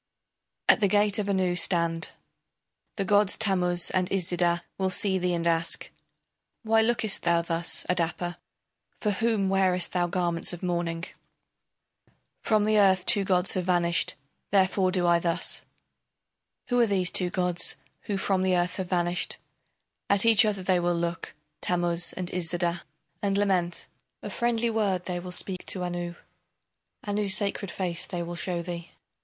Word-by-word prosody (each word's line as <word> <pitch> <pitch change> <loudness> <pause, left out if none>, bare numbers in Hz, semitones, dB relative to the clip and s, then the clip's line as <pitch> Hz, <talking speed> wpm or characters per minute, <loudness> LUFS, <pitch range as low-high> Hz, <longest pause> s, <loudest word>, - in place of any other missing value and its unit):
] - - -57
At - - +6
the 205 - +3
gate 205 +2 +2
of 205 -1 -2
Anu 185 -2 +1
stand. 170 -2 +1 0.9
The 195 - -2
gods 205 0 +3
Tammuz 180 -4 +2
and 185 -1 0
Iszida 175 -2 0 0.2
will 190 0 +1
see 190 0 +1
thee 180 -1 0
and 170 0 -2
ask: 165 0 0 0.7
Why 225 0 +3
lookest 220 -2 +1
thou 170 -1 +2
thus, 170 0 -1
Adapa, 175 0 -1 0.6
For 210 - 0
whom 215 -1 0
wearest 190 -2 +1
thou 175 -1 0
garments 175 -1 +1
of 175 - -8
mourning? 170 -2 -2 1.4
From 215 -2 +2
the 215 0 +3
earth 190 -2 +4
two 205 -4 +4
gods 185 -1 +1
have 185 -2 -2
vanished, 170 -2 +1 0.3
therefore 190 -1 +2
do 180 -1 +1
I 170 0 +4
thus. 170 -1 0 1.0
Who 245 -1 +2
are 235 - +4
these 190 -3 +2
two 180 -1 +1
gods 180 -1 0 0.3
who 205 - -2
from 190 -1 0
the 185 -1 +2
earth 175 0 -1
have 185 -2 -4
vanished? 175 -1 -1 0.7
At 200 +1 +4
each 225 -2 +6
other 200 -3 -1
they 185 -1 +2
will 175 0 0
look, 170 0 -4 0.3
Tammuz 175 -1 +1
and 180 -1 -5
Iszida, 175 -1 -1 0.4
and 200 -1 0
lament. 185 -4 0 0.4
A - - -6
friendly 235 -1 0
word 200 -5 0
they 180 -1 -4
will 180 +1 -8
speak 185 0 0
to 185 - -2
Anu 175 -1 -4 0.9
Anu's 205 -1 +1
sacred 200 -1 -2
face 170 -1 -3
they 175 -1 -4
will 175 +1 -6
show 170 0 -3
thee. 170 -1 -7
180 Hz, 160 wpm, -27 LUFS, 175-200 Hz, 1.4 s, At